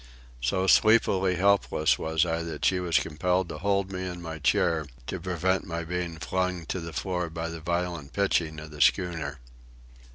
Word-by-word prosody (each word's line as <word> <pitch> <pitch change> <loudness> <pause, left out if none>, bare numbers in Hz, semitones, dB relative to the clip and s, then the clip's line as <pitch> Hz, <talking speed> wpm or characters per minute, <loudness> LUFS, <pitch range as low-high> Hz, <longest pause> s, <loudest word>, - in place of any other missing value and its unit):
So 95 +10 +1
sleepily 95 -3 +4
helpless 95 -4 +2
was 80 +1 +1
I 85 -1 -1
that 85 -1 -4
she 95 - +3
was 85 -2 +2
compelled 90 +3 0
to 75 - -6
hold 100 0 0
me 95 -1 -4
in 90 -1 -6
my 80 -2 -6
chair 80 +2 +2 0.2
to 95 - -4
prevent 90 +1 0
my 85 -1 -3
being 85 0 -3
flung 90 0 -2
to 95 - -1
the 85 -1 -6
floor 90 +1 -2
by 80 +1 -4
the 85 -1 -7
violent 85 -3 -2
pitching 85 -5 0
of 75 0 -10
the 75 -1 -7
schooner. 80 -4 +2
85 Hz, 175 wpm, -27 LUFS, 80-95 Hz, 0.2 s, sleepily